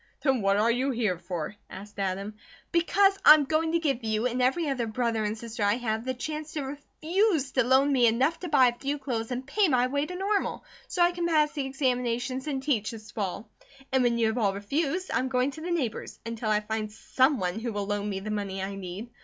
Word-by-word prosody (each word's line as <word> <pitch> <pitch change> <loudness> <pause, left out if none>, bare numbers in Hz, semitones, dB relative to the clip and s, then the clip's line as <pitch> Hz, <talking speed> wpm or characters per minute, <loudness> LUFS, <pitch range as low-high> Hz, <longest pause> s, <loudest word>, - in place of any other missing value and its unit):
"Then 265 -5 +2
what 195 0 +2
are 225 +3 +3
you 255 +3 0
here 220 -9 0
for?" 175 0 -5
asked 205 +1 -10
Adam. 195 +2 -2 0.4
"Because 390 +3 +3
I 305 - +11
am 305 - +1
going 320 +3 0
to - - +4
give 275 -7 -1
you, 220 +1 0
and 250 0 0
every 285 +6 +2
other 255 -5 -1
brother 225 -1 -1
and 210 +1 -2
sister 230 0 -7
I 205 +1 +3
have, 225 -1 -2
the 260 0 -2
chance 305 +4 -5
to 300 - -2
REFUSE 310 - -1
to 255 - +2
loan 265 +3 +4
me 245 -3 +5
enough 265 +8 +2
to 360 - -5
buy 265 -4 +6
a - - -4
few 280 +1 -2
clothes 235 -5 -3
and 255 +1 -4
pay 395 +9 +2
my 250 -5 +3
way 285 +3 -1
to 360 - -6
Normal, 395 +2 -1 0.2
so 355 - +1
I 345 - +4
can 345 -1 -2
pass 305 -3 +3
the 280 -3 -3
examinations, 255 -1 -1
and 270 -3 -2
teach 240 -8 0
this 215 -2 -9
fall. 205 +1 -4 0.4
And 265 0 +3
when 240 -1 +2
you 230 - +2
have 220 +2 0
all 200 -3 +1
refused, 290 - -2
I - - +2
am 260 - -1
going 255 +1 +1
to 315 - -10
the 345 - -4
neighbours, 285 -10 -2
until 230 -1 -3
I 210 0 +2
find 215 0 -3
someone 225 -5 +1
who 235 +1 -3
will 205 -1 -3
loan 205 0 -2
me 195 -1 -3
the 215 +2 -5
money 200 -2 -3
I 190 +1 -3
need. 195 +4 -7
250 Hz, 235 wpm, -27 LUFS, 215-290 Hz, 0.4 s, I